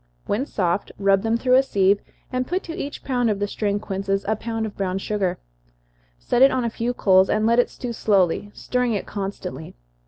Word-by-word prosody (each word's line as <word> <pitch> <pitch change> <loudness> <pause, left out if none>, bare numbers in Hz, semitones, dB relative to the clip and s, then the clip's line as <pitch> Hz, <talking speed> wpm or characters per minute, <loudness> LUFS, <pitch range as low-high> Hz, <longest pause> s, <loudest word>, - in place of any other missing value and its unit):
When 255 +8 -1
soft, 180 0 -1
rub 195 -1 +3
them 225 +2 +1
through 255 +1 +1
a - - +7
sieve, 200 -6 +2 0.3
and 255 0 -1
put 365 +2 -1
to 330 - -6
each 290 -5 -6
pound 245 -3 +1
of 210 - 0
the 205 - -1
strained 205 0 -2
quinces 195 0 -2
a 220 - +2
pound 225 +1 -3
of 215 - -6
brown 190 -1 -1
sugar. 195 -2 -1 0.8
Set - - 0
it 270 - +9
on 255 - 0
a 230 - -1
few 235 +2 -2
coals, 190 -3 +4
and 215 0 +1
let 235 +2 +4
it 245 - +3
stew 245 -2 -6
slowly, 200 -2 +1
stirring 250 -3 0
it 200 - -3
constantly. 195 -5 -6
210 Hz, 210 wpm, -23 LUFS, 195-245 Hz, 0.8 s, it